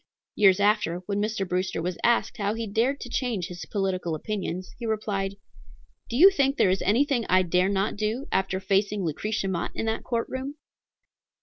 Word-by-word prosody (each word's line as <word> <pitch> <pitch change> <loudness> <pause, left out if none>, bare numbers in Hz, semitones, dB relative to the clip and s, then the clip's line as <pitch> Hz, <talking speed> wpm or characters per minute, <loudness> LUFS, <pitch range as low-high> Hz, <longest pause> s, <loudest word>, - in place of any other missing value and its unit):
Years 195 -2 +5
after, 205 -4 +2
when 205 +1 -1
Mr. 210 -2 -1
Brewster 180 -1 -1
was 175 +1 -3
asked 235 0 +2
how 205 +1 -1
he 230 0 -3
dared 235 +7 0
to - - -6
change 240 -7 -1
his 180 0 -7
political 185 -5 -1
opinions, 185 0 -4
he 235 - -4
replied, 200 -3 -2 0.7
"Do 235 - -3
you 380 +7 +9
think 275 -5 +1
there 185 - +4
is 190 - 0
anything 240 - +2
I 185 0 +5
dare 180 +2 +2
not 200 +1 0
do, 220 +6 -2
after 190 0 0
facing 195 +1 0
Lucretia 195 +6 -2
Mott 175 -3 -2
in - - -2
that 225 0 -2
court 235 -2 -1
room?" 265 +2 -5
205 Hz, 185 wpm, -26 LUFS, 185-230 Hz, 0.7 s, you